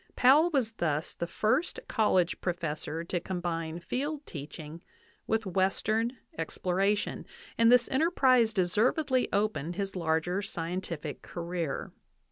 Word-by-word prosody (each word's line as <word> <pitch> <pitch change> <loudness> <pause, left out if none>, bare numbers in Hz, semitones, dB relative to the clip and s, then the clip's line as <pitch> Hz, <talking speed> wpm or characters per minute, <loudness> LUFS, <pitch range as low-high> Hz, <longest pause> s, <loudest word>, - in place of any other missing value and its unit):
Powell 290 +7 +6
was 265 -8 +1
thus 155 -7 -1
the 170 - -4
first 225 - 0
college 185 -6 +2
professor 165 -2 -3
to 175 +1 -2
combine 170 -3 -3
field 285 - -3
teaching 155 +2 -8 0.5
with 225 0 0
'western 215 +6 +1 0.2
exploration, 190 +5 0 0.3
and 230 0 +5
this 245 -1 +6
enterprise 265 -6 +4
deservedly 235 - +2
opened 200 -5 0
his 195 0 -3
larger 170 +2 0
scientific 170 -4 -4
career. 170 -4 -4
190 Hz, 110 wpm, -30 LUFS, 170-230 Hz, 0.5 s, Powell